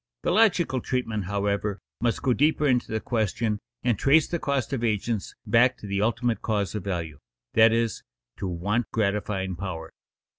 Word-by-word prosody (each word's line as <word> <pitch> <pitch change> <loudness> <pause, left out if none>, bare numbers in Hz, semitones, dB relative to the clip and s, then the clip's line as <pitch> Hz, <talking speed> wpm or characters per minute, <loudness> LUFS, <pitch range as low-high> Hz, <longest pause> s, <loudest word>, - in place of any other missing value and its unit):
The - - +1
logical 180 - +3
treatment, 115 -6 -2
however, 100 +1 -1 0.2
must 120 0 0
go 130 -2 +3
deeper 150 +5 +2
into 125 -5 +2
the 110 - 0
question 110 -1 -1 0.2
and 120 -5 +1
trace 150 +3 +4
the 170 - -2
cost 140 -4 -1
of 125 -3 -2
agents 110 -1 -1
back 125 +2 +4
to - - -10
the 100 0 -1
ultimate 115 +1 0
cause 105 -3 -1
of 105 -3 -4
value, 85 -6 -3 0.3
that 110 0 +6
is, 115 -2 0 0.4
to 95 - -3
want 100 +7 -1
gratifying 100 -3 -1
power. 85 -3 -6
110 Hz, 170 wpm, -26 LUFS, 100-125 Hz, 0.4 s, that